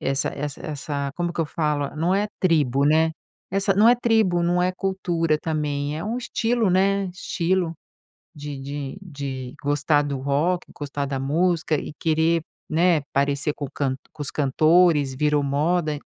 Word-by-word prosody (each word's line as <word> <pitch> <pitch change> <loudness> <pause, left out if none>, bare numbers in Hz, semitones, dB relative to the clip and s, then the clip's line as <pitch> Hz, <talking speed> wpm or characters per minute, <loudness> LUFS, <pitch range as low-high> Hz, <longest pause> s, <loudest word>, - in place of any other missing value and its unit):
essa 135 0 0
essa 145 0 -5
essa 140 -1 -3
como 175 -1 -1
que - - -2
eu 160 - 0
falo? 150 -3 -1
Não 170 +4 +1
é 205 +2 +1
tribo, 145 -6 +2
né? 160 +2 +4 0.4
Essa 195 +1 +1
não 215 +3 +6
é 245 - +7
tribo, 220 -8 +2
não 175 +1 +2
é 180 - +2
cultura 175 -5 0
também, 150 -2 -2
é 165 - -5
um 225 +3 -2
estilo 230 -3 0
né, 195 +1 +2
estilo 175 -1 -1 0.6
de 145 -2 -6
de 140 +3 -5
de 135 -7 -6
gostar 145 +1 +2
do 140 -2 -3
rock, 150 +7 0
gostar 145 -1 -3
da 135 -1 -3
música 165 +3 +1
e 150 - -4
querer, 160 +1 +2 0.3
né, 165 0 +3
parecer 140 +1 +1
com 145 - -5
o 135 - -11
cant 135 -3 -1 0.2
com 155 - -9
os 140 - -3
cantores, 155 0 +3
virou 150 +1 +2
moda 155 +2 0
155 Hz, 170 wpm, -23 LUFS, 145-180 Hz, 0.6 s, é